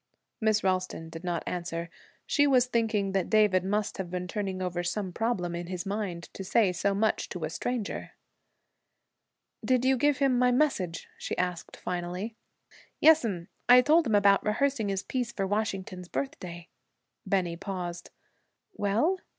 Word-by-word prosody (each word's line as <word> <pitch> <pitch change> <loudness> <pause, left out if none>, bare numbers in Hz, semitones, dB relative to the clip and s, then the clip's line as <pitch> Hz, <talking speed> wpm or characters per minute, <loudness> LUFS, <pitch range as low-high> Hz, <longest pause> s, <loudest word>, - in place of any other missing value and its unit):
Miss 215 -1 +2
Ralston 185 -3 -1
did 165 +1 -9
not 175 -2 -2
answer. 170 -1 -4 0.3
She 290 -1 +3
was 255 -3 +5
thinking 225 -5 0
that 190 -2 0
David 210 -4 +4
must 205 +2 -1
have 185 -2 -3
been 180 0 -3
turning 195 -2 -3
over 180 -1 -2
some 180 +2 -2
problem 195 -6 -1
in 170 0 -4
his 180 +1 -4
mind, 195 -4 -3
to 195 - -6
say 195 0 +3
so 195 +3 0
much 215 +2 +1
to 180 -3 -5
a 155 - -2
stranger. 240 +3 -3 1.5
'Did 255 -1 +2
you 265 0 +4
give 290 +2 +3
him 270 -3 +2
my 250 0 +4
message?' 245 - 0
she - - -4
asked 180 -1 -3
finally. 180 +5 -4 0.6
'Yes'm! 225 - +4 0.2
I 250 0 +9
told 315 +2 +4
him 220 - +2
about 200 -1 +5
rehearsing 225 0 +1
his 195 0 -1
piece 250 -3 -2
for 195 -4 -2
Washington's 195 -3 -2
Birthday.' 175 -9 -5 0.5
Bennie 180 -4 0
paused. 175 -2 -5 0.6
'Well?' 230 - +1
195 Hz, 155 wpm, -29 LUFS, 180-235 Hz, 1.5 s, I